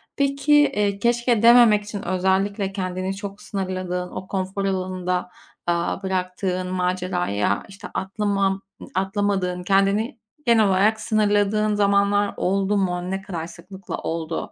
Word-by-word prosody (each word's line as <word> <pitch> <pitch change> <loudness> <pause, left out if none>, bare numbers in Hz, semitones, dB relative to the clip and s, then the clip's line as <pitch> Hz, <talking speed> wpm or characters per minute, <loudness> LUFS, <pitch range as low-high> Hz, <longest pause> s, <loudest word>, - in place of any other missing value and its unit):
Peki, 280 +1 +1
eee, 210 -9 +3
keşke 235 0 +2
dememek 235 -3 +7
için 205 -1 -6
özellikle 190 +2 0
kendini 185 0 -3
çok 200 0 -7
sınırladığın, 185 -2 -3
o 190 - -7
konfor 195 +1 -2
alanında, 185 -1 -2 0.4
aaa, 170 +3 -1
bıraktığın 185 0 -2
maceraya, 180 - 0
işte, 195 0 -10
atlıma 195 0 0 0.3
atlamadığın, 190 -2 0
kendini 200 +6 +2 0.3
genel 225 -3 +5
olarak 205 +3 +3
sınırladığın 210 0 +2
zamanlar 200 0 +2
oldu 195 +2 +1
mu, 180 -1 -1
ne 195 - -2
kadar 170 -4 -5
sıklıkla 185 +2 -8
oldu? 165 0 -4
195 Hz, 120 wpm, -23 LUFS, 185-205 Hz, 0.4 s, dememek